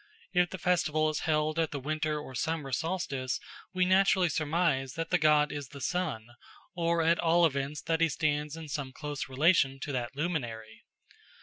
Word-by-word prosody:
If 180 -1 +3
the 190 - -6
festival 155 -4 +1
is 155 - -3
held 155 +1 +1
at 160 - +1
the 145 - -4
winter 155 +2 -1
or 140 -3 -9
summer 150 +1 -2
solstice, 140 -4 -2 0.3
we 185 -1 +1
naturally 190 -1 +4
surmise 150 -4 0
that 165 0 -4
the 180 - +3
god 150 -1 +4
is 145 -2 -5
the 140 - -11
sun, 150 -5 -2 0.5
or 170 -1 +1
at 165 +1 +3
all 170 +1 +4
events 140 -1 -2
that 165 0 0
he 165 - +4
stands 150 0 -1
in 160 -1 -8
some 140 -3 -4
close 145 -2 -5
relation 135 -1 +3
to 145 - -4
that 125 -1 -3
luminary. 120 -9 -4
155 Hz, 180 wpm, -30 LUFS, 140-165 Hz, 0.5 s, naturally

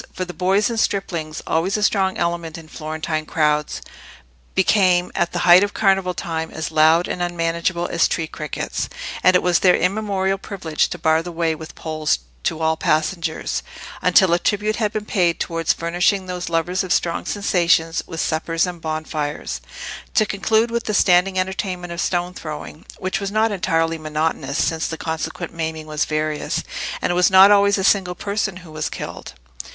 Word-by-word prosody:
For 185 - -4
the 180 - -8
boys 190 +5 +2
and 230 -2 -2
striplings, 170 -7 -2
always 180 +6 0
a 210 - -2
strong 190 -2 +2
element 170 -1 -2
in 165 -1 -11
Florentine 155 0 -4
crowds, 150 -1 0 0.7
became 185 -2 +3
at 175 - 0
the - - -3
height 175 +2 +8
of 205 - -2
Carnival 195 -3 +2
time 160 -2 -3
as 160 0 -5
loud 160 +2 +4
and 180 - -4
unmanageable 170 0 -1
as - - +2
tree 165 - -1
crickets, 150 -1 -4 0.3
and 185 - +5
it 180 - +3
was 180 -1 +3
their 180 -2 +5
immemorial 195 0 0
privilege 175 -7 -1
to - - -5
bar 160 -1 +2
the 175 +1 -7
way 165 -1 0
with 160 0 -9
poles 155 - -1 0.3
to 160 - -1
all 160 0 +1
passengers, 160 +1 -1 0.4
until 190 -4 +5
a 175 - +3
tribute 210 +4 0
had 215 -3 0
been 215 -1 -4
paid 175 -5 +1
towards 165 -1 0
furnishing 175 +3 +1
those 180 -1 -4
lovers 170 +3 0
of 185 - -5
strong 170 -1 +1
sensations 170 -5 +1
with 165 -2 -6
suppers 165 +3 0
and 175 -2 -6
bonfires: 155 -1 -3 0.5
to 215 - +4
conclude 220 +3 +1
with 235 0 -2
the 215 - -1
standing 185 0 +4
entertainment 185 -1 -2
of 170 - -3
stone 175 0 -1
throwing, 155 -1 -8
which 185 0 -2
was 200 - -3
not 220 +1 +2
entirely 165 -4 0
monotonous, 155 -2 -2
since 160 -1 0
the 160 - -5
consequent 160 +2 -4
maiming 160 -1 -4
was 155 0 -1
various, 155 0 -2 0.4
and - - +1
it - - 0
was 180 0 +4
not 190 +1 +8
always 200 0 +5
a 190 - -1
single 185 -2 +2
person 200 -1 -2
who 160 - -12
was 155 0 -3
killed. - - -7
175 Hz, 180 wpm, -21 LUFS, 160-190 Hz, 0.7 s, height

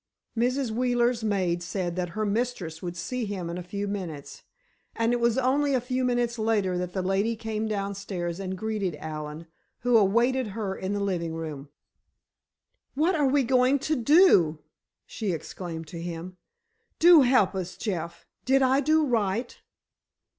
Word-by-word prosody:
Mrs. 250 +1 0
Wheeler's 240 0 +1
maid 185 -5 0
said 175 -1 -3
that 180 -1 -2
her 215 - 0
mistress 205 -7 -2
would 175 -1 -5
see 250 +7 -3
him 185 -5 -4
in 175 - -4
a - - -5
few 200 +3 -4
minutes. 175 -8 -6 0.5
And 230 +1 +1
it 240 - +1
was 235 0 +2
only 275 +2 +2
a - - +3
few 255 +1 -2
minutes 240 -1 0
later 210 -4 +1
that 180 0 -4
the 190 - -2
lady 195 +5 +1
came 220 -1 -3
downstairs 195 -4 -3
and 190 -1 -4
greeted 205 -4 -2
Allen, 155 +1 -6 0.4
who 245 -1 +2
awaited 235 +5 +2
her 200 -3 -2
in 190 +1 -3
the 205 - -1
living 175 -5 -2
room. 150 -4 -6 1.3
"What 320 +6 +2
are 295 -5 +2
we 275 +1 +3
going 255 +2 +3
to 305 +3 -1
do?" 245 - +5 0.5
she 210 -5 -3
exclaimed 165 0 -6
to 170 0 -7
him. 175 +1 -6 0.6
"Do 340 -2 +8
help 250 -6 +4
us, 185 -1 -5
Jeff. 170 -6 -4 0.2
Did 270 +1 +3
I 260 +1 +4
do 310 +2 +3
right?" 230 -1 -1
210 Hz, 160 wpm, -27 LUFS, 180-250 Hz, 1.3 s, Do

